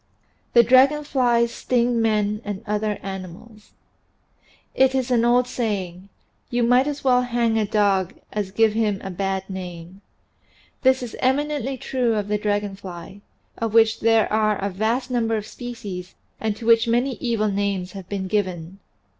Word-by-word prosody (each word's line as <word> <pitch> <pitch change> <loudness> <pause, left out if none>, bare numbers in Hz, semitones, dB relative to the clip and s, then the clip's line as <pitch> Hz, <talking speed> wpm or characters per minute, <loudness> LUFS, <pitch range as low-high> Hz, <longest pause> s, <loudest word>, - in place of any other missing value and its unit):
THAT 235 -2 +6
DRAGON 275 +4 +5
FLIES 240 -4 +1
STING 240 -1 +1
MEN 210 -1 +1
AND 205 0 -5
OTHER 210 0 -1
ANIMALS 195 +3 -9 1.1
)T - - -1
is 260 -1 -1
an 235 -2 +3
old 245 +1 +4
saying, 200 -6 -4 0.4
"You 240 -1 0
might 250 +3 +4
as 290 -1 -4
well 250 -2 +4
hang 235 -2 0
a 210 - 0
dog 200 -3 +1 0.2
as 205 -2 -2
give 220 +2 +2
him 215 -3 0
a 190 - -5
bad 190 +1 -2
name." 180 -1 -8 0.8
This 260 -1 +3
is 240 - -7
eminently 275 0 0
true 245 -3 -1
of 205 -1 -2
the 210 0 0
dragon 205 -1 -1
fly, 190 +1 -10 0.4
of 225 -1 -2
which 225 -1 +4
there 225 -1 +3
are 215 -1 +2
a 200 +1 -3
vast 230 +7 -1
number 225 -2 +1
of 210 - -5
species 210 -7 -8 0.2
and 220 -2 -1
to 225 - -9
which 230 0 +5
many 245 +3 +1
evil 225 -3 0
names 195 -2 -2
have 190 -2 -10
been 195 -2 -3
given. 185 -2 -2
220 Hz, 165 wpm, -23 LUFS, 195-240 Hz, 1.1 s, THAT